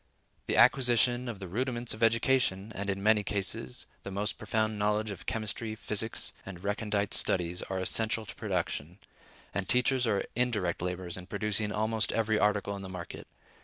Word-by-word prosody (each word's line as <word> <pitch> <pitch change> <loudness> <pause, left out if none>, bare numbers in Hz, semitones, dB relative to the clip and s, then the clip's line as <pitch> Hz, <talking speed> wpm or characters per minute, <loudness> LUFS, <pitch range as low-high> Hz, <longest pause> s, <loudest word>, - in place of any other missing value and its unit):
The - - +1
acquisition 125 -1 +5
of 115 - -5
the 95 -1 -7
rudiments 120 +4 0
of 110 - -10
education, 115 -3 +2
and, 100 0 -4
in 100 0 -2
many 105 0 +5
cases, 100 -11 -2 0.2
the - - -7
most 100 +2 -2
profound 110 -1 -1
knowledge 105 +1 +1
of 95 -2 -9
chemistry, 110 0 -3
physics 110 +1 0
and 90 -2 -9
recondite 105 0 -1
studies, 90 -1 +1
are 95 - -4
essential 110 +4 +2
to - - -9
production; 85 +6 -3 0.6
and 100 -1 -3
teachers 125 0 +4
are 100 -3 +1
indirect 110 -9 0
laborers 90 0 -3
in 90 -1 -9
producing 105 +1 -1
almost 110 +1 0
every 110 -1 +1
article 105 -1 +1
in 100 - -7
the 95 - -7
market. 90 -2 -8
105 Hz, 165 wpm, -30 LUFS, 95-115 Hz, 0.6 s, acquisition